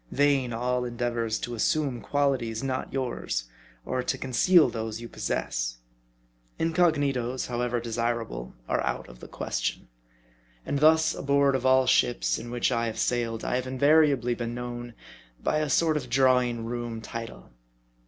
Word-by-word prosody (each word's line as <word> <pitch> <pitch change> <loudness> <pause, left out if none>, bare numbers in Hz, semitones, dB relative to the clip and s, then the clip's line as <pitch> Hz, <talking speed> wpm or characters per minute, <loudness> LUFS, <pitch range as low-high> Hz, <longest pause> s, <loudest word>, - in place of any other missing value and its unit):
Vain 140 -3 +2
all 125 +2 -1
endeavors 120 -2 -1
to 120 - -5
assume 135 0 0
qualities 135 -5 0
not 130 -1 -2
yours; 125 - -2 0.4
or 130 0 -1
to - - -1
conceal 155 +7 +4
those 110 -1 -4
you 120 - -7
pos - - -12
sess. - - -2 0.8
Incognitos, 145 -7 +1
however 120 0 -1
desirable, 115 - -3
are - - 0
out - - -2
of 60 -1 -14
the - - -10
ques - - -4
tion. - - -3 0.8
Arid 140 - -1
thus 160 +1 +5
aboard 140 0 +2
of 130 0 0
all 130 0 +5
ships 125 -1 +2
in 120 - -8
which 120 +2 0
I 115 -1 0
have 110 0 -4
sailed, 115 -1 -1
I 125 - 0
have 130 0 -3
invariably 140 -2 +3
been 120 0 -4
known 120 -1 -6 0.4
by 155 - 0
a 155 -1 -1
sort 160 +1 +3
of 130 -5 -3
drawing 125 -2 +3
room 120 -1 -4
title. 115 - -8
125 Hz, 155 wpm, -27 LUFS, 115-135 Hz, 0.8 s, thus